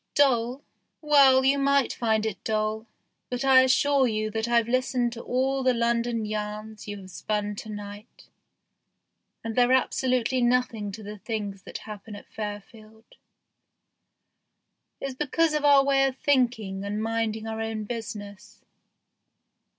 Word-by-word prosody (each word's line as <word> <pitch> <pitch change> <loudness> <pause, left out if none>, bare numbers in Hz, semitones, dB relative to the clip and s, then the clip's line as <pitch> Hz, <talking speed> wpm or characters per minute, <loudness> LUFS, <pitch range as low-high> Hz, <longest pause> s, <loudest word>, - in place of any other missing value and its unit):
Dull? 255 -1 +2 0.4
Well, 275 -4 +5
you 280 +1 +3
might 280 -1 +2
find 220 -2 0
it 205 -4 -4
dull, 215 +1 -1 0.4
but 250 +2 -3
I 265 -1 +7
assure 265 +1 +3
you 215 -1 -2
that 220 +1 -2
I've 235 -1 +2
listened 250 -1 0
to 235 - -8
all 265 +2 0
the 255 -1 +2
London 235 -1 0
yarns 215 0 -5
you 205 0 -5
have 185 0 -12
spun 210 +3 -3
to 215 - -8
night, 205 +1 -9 1.2
and 225 -1 -4
they're 245 0 +4
absolutely 255 -1 +1
nothing 240 -4 +1
to 215 - -8
the 210 0 -8
things 205 -3 -4
that - - -6
happen 210 0 -9
at 205 - -11
Fairfield. 215 +1 -9 1.9
It's 275 -1 -4
because 300 +4 0
of 300 -1 0
our 280 -1 +6
way 275 -1 +3
of 265 -1 -5
thinking 235 -9 0
and 205 +2 -3
minding 225 -1 -2
our 225 0 -4
own 220 -1 -3
business. 205 -3 -8
230 Hz, 145 wpm, -26 LUFS, 215-260 Hz, 1.9 s, I